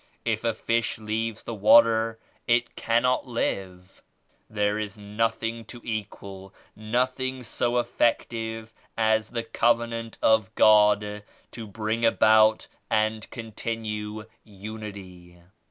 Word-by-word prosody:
If 110 -1 -1
a 115 -2 0
fish 115 0 -1
leaves 110 +1 -3
the 115 - -5
water 115 +1 +5 0.3
it 120 0 +1
cannot 125 +3 +1
live. 95 -6 -4 0.5
There 105 0 0
is 105 0 -5
nothing 115 +2 -2
to 120 +3 -10
equal, 100 -3 -7 0.2
nothing 130 +4 -2
so 120 +1 -1
effective 115 -2 -1 0.2
as 110 -1 +2
the 115 -1 -3
Cov 115 +1 +2
enant 115 -1 -6
of 110 -3 +2
God 105 -1 +4 0.3
to 115 -2 -8
bring 110 +3 -3
about 110 -1 +4 0.2
and 110 -1 0
continue 110 -2 -5 0.2
Unity. 100 -4 -10
110 Hz, 110 wpm, -26 LUFS, 105-115 Hz, 0.5 s, water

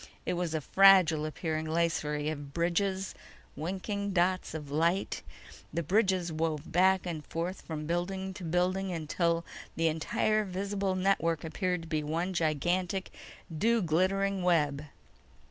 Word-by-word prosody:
It - - 0
was 175 -2 -2
a 155 - -1
fragile 180 -3 +6
appearing 155 0 -3
lacery 155 -2 0
of 145 -2 -8
bridges, 190 +3 0 0.4
winking 195 +4 -3
dots 180 -1 +1
of 150 -3 -6
light. 170 +6 +1 0.5
The 170 - -2
bridges 185 -1 +2
wove 155 -1 -2
back 190 +2 +4
and 165 -4 -4
forth 170 +5 -4
from 155 -2 -5
building 190 +3 -2
to 190 -1 -9
building 180 +3 0
until 170 +1 0 0.3
the 165 0 +2
entire 215 +7 +1
visible 195 0 -2
network 175 -4 +1
appeared 180 +1 -2 0.2
one 165 +5 -2
gigantic 175 +4 0 0.4
dew 225 +6 +2
glittering 190 +4 +1
web. 150 -5 +2
175 Hz, 130 wpm, -30 LUFS, 160-190 Hz, 0.5 s, fragile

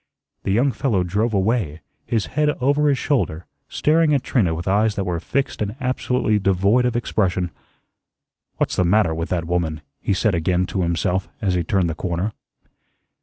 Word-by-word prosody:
The - - -2
young 125 +7 +3
fellow 115 -9 0
drove 105 +6 0
away, 95 -6 0 0.3
his 115 -3 0
head 150 0 +2
over 145 +3 +3
his 140 - +2
shoulder, 105 - -1 0.2
staring 155 0 +3
at 135 - 0
Trina 90 -10 +1
with 85 +3 -5
eyes 105 +2 +2
that 100 - -1
were 90 -3 -2
fixed 135 +10 -2
and 105 +1 -2
absolutely 125 -4 0
devoid 100 +5 +2
of 125 -1 0
expression. 90 -6 0 1.1
"What's - - 0
the - - +3
matter 90 -1 +3
with 80 +1 -3
that 85 -2 -1
woman?" 85 -2 -1 0.2
he 100 - 0
said 105 +2 +1
again 90 +2 +1
to 95 - 0
himself 90 +2 0
as 95 -3 0
he 90 -1 +1
turned 90 +1 +1
the 80 - -2
corner. 90 +5 -2
100 Hz, 175 wpm, -22 LUFS, 90-120 Hz, 1.1 s, young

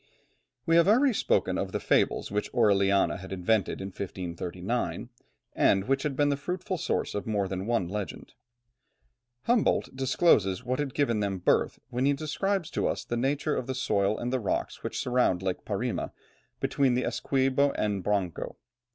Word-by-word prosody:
We 165 0 +4
have 170 +1 +5
already 250 +5 +5
spoken - - +1
of - - -3
the - - 0
fables - - +1
which 105 +1 -2
Orellana 100 -4 +3
had 95 +1 -10
invented 95 +2 0
in 95 - -4
1539, 95 +5 -4 0.4
and 95 0 +3
which 135 +1 +2
had 145 -2 -2
been 145 +1 +2
the 140 - +2
fruitful 180 +4 -3
source - - -1
of 105 - -4
more 100 -3 0
than 95 +1 -4
one 115 -7 +1
legend. 105 +2 -6 1.1
Humboldt 235 - +1
discloses 130 - +2
what 125 +2 -2
had 140 -3 -3
given 120 -7 +1
them 100 -2 -1
birth 90 - +1
when 125 +2 0
he 145 - +4
describes 170 +5 -2
to - - 0
us - - -2
the 120 - -2
nature 140 +5 0
of 130 - -3
the 130 - -2
soil 105 -5 +1
and 125 +1 -3
the 130 - +1
rocks 105 - -2
which - - -4
surround 125 -7 +1
Lake 95 -1 -3
Parima, - - -2 0.5
between 135 -3 +2
the 125 - 0
Essequibo 135 +1 +1
and 105 -2 -1
the - - -6
Branco. 95 -5 -1
120 Hz, 175 wpm, -28 LUFS, 100-140 Hz, 1.1 s, have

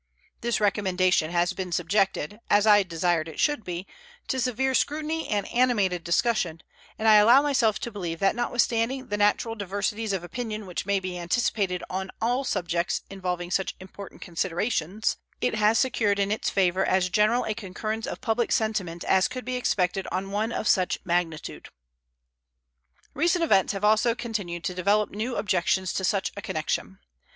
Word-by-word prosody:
This 235 -1 0
recommendation 185 -5 +2
has 175 +2 +1
been 185 -1 -5
subjected, 190 +1 0
as 205 +1 +4
I 205 -1 +7
desired 170 -2 0
it 160 - -9
should 295 -7 +1
be, 180 0 -5 0.4
to 260 - 0
severe 255 +2 0
scrutiny 310 +4 -1
and 205 -2 -1
animated 210 -8 +1
discussion, 170 -2 0 0.3
and 220 - -1
I 215 -1 +8
allow 235 +7 +7
myself 260 -7 +2
to 235 - -4
believe 175 -6 -4
that 195 +3 +2
notwithstanding 240 +2 0
the 205 - -1
natural 210 +2 +2
diversities 205 +1 -2
of 190 -3 -2
opinion 215 +2 -5
which 180 0 -5
may 200 -1 +2
be 185 -1 -5
anticipated 185 0 0
on 190 +1 -4
all 245 +4 0
subjects 175 -7 -1
involving 180 -2 -4
such 190 +1 -1
important 190 +1 -11
considerations, 185 +2 -1 0.2
it 250 - 0
has 215 +1 +3
secured 220 -6 +1
in 200 0 0
its 215 - 0
favor 190 -1 +2
as 185 -1 +2
general 215 +6 +3
a 215 - -1
concurrence 215 +1 -4
of - - -6
public 230 +1 0
sentiment 195 -6 -1
as 190 0 +3
could 255 -3 -7
be 255 0 -2
expected 190 -6 0
on 195 +1 -3
one 215 +3 -1
of 225 - -2
such 185 -1 +2
magnitude. 170 -3 -2 1.4
Recent 340 +4 +2
events 195 - +3
have 200 +1 -2
also 220 +2 +3
continued 200 -9 -4
to 180 - -2
develop 200 +4 +1
new 230 +4 -3
objections 185 -1 0
to 190 - -2
such 190 +1 0
a 205 - -6
connection. 150 - -3
200 Hz, 165 wpm, -26 LUFS, 180-225 Hz, 1.4 s, I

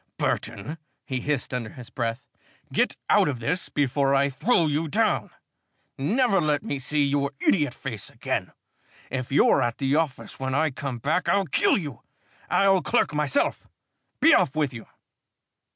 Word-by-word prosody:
"Burton," 115 +8 -2 0.3
he 130 -1 -2
hissed 145 -2 -2
under 120 -3 -3
his 125 0 -12
breath, 115 0 -3 0.5
"get - - +1
out - - +4
of 140 -4 -1
this 180 +11 -2
before 140 -1 +1
I 140 +1 +3
throw 170 - +2
you 155 +2 0
down! 145 - +1 0.7
Never 200 - +2
let 150 -2 +1
me 140 - -3
see 145 +3 +1
your 140 0 0 0.2
idiot 145 -8 +2
face 115 -7 -6
again! - - -3 0.6
If 130 -1 -3
you're 140 - +4
at 120 -1 -1
the 135 0 0
office 160 -4 -3
when 130 0 -2
I 155 +1 +2
come 135 -1 -5
back, 150 +9 0
I'll 200 -1 +3
kill 145 - +2
you! 145 - -6 0.5
I'll 195 -1 +4
clerk 150 - +1
myself. 150 -3 0 0.5
Be - - +6
off 135 - +3
with 150 -4 0
you!" 115 -2 -9
140 Hz, 160 wpm, -25 LUFS, 130-155 Hz, 0.7 s, Be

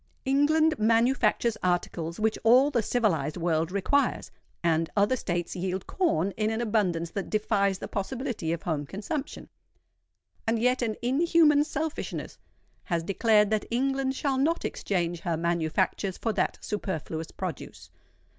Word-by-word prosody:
England 305 +3 +3
manufactures 230 0 +2
articles 175 -1 -1
which 220 0 0
all 255 +6 +6
the 240 - +2
civilised 180 - 0
world 165 -1 0
requires; 200 +9 0 0.3
and 165 -1 +1
other 205 +5 +3
states 175 -7 -3
yield 185 +1 -3
corn 200 - 0
in 215 0 +1
an 225 0 -2
abundance 190 -8 0
that 195 - -4
defies 200 -2 +1
the - - -6
possibility 235 - -3
of 170 -1 -3
home 155 -4 -1
consumption. 215 - -5 1.0
And 225 +1 +2
yet 250 +3 +2
an 225 -3 -1
inhuman 300 +2 +4
selfishness 310 0 -4 0.5
has 170 -4 -1
declared 210 +2 +3
that 215 -1 0
England 270 +2 0
shall 270 -1 0
not 325 +5 +1
exchange 175 -3 -2
her 165 -1 -2
manufactures 170 +3 0
for 225 - -1
that 195 - 0
superfluous 165 -5 -4
produce. - - -7
215 Hz, 135 wpm, -27 LUFS, 175-260 Hz, 1.0 s, all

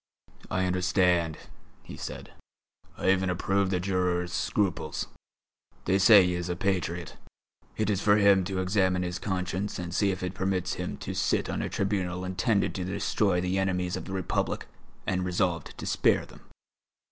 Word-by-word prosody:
"I 95 0 0
understand," 90 -3 +2 0.5
he - - -9
said, - - -7 0.7
"I 95 - +3
even 95 -1 +1
approve 95 +2 +1
the 90 -1 0
juror's 90 -2 0
scruples. 95 -4 -1 0.8
They 95 +2 +2
say 100 -1 +8
he 90 - 0
is 90 0 -3
a 90 - -1
patriot; 85 -3 -2 0.6
it 110 - 0
is 100 -2 0
for 105 0 +5
him 100 -2 +5
to 95 0 -2
examine 95 -1 +1
his 90 0 -3
conscience 95 +1 -2
and 85 -1 -5
see 100 +1 +2
if 95 -1 -3
it 90 0 -2
permits 95 -2 -1
him - - -4
to - - -3
sit - - 0
on - - -2
a - - -2
tribunal 95 -2 -1
intended 95 +3 +1
to 95 - -3
destroy 95 0 0
the 90 +2 0
enemies 90 -2 0
of - - -6
the 95 - -6
Republic 95 -2 -1 0.4
and 90 -1 0
resolved 90 -2 -1
to - - -6
spare - - +2
them. - - -16
95 Hz, 170 wpm, -28 LUFS, 90-95 Hz, 0.8 s, say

